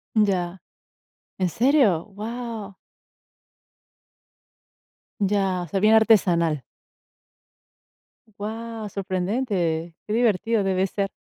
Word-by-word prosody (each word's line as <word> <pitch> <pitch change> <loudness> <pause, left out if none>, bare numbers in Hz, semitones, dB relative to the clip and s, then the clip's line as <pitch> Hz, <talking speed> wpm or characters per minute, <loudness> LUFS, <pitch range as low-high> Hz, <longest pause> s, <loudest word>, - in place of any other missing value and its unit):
Ya, 190 -4 +1 0.8
¿en 185 - +1
serio? 230 - +3
Guau. 220 0 -6 2.5
Ya, 195 -2 +1
osea 175 +3 -2
bien 215 +1 +5
artesanal. 175 - +3 1.8
Guau, 225 +1 -5
sorprendente, 185 -4 -2
qué 210 - -2
divertido 225 -1 +2
debe 190 0 +1
ser. 195 +1 -2
200 Hz, 75 wpm, -24 LUFS, 185-220 Hz, 2.5 s, bien